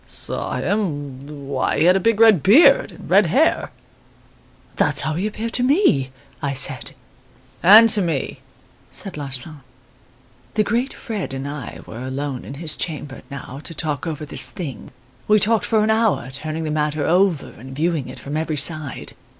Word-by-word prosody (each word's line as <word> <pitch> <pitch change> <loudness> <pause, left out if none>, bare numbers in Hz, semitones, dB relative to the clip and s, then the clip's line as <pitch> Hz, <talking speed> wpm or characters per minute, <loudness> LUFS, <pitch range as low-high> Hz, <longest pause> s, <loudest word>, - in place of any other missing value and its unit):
"'Saw - - -3
him! 145 -7 -3
why, 135 -2 -1
he - - +3
had 180 +1 +6
a - - +3
big 225 +2 +1
red 220 -7 +6
beard 330 - +5
and - - -12
red - - +4
hair.' - - +2 1.1
"'That's - - +1
how 155 - -2
he 180 +7 -1
appeared 225 +2 -5
to - - 0
me,' 250 - +3 0.3
I 140 -1 -2
said. 135 -1 0 0.7
"'And 215 +6 +9
to 210 - +5
me,' 165 -7 -2 0.5
said 195 - -5
Larsan. 140 +1 -3 0.9
"The 215 - +3
great 240 +5 -1
Fred 205 - -5
and 135 +1 -5
I 145 -4 -7
were 115 - -9
alone 130 0 -4
in 140 - -8
his 155 +1 -2
chamber, 145 -4 -4
now, 140 -1 -8
to 165 - -7
talk 150 +1 -3
over 155 -1 -4
this - - +3
thing. 140 - -7 0.4
We 215 - +5
talked 220 +1 +2
for 220 -2 +2
an 220 - +2
hour, 220 - +1
turning 155 +4 -5
the 155 - -3
matter 150 -1 -1
over 180 -3 +2
and 130 +3 -11
viewing 160 -2 -1
it - - -9
from 145 +2 -6
every 155 -1 -2
side. 155 0 -1
155 Hz, 175 wpm, -21 LUFS, 140-205 Hz, 1.1 s, And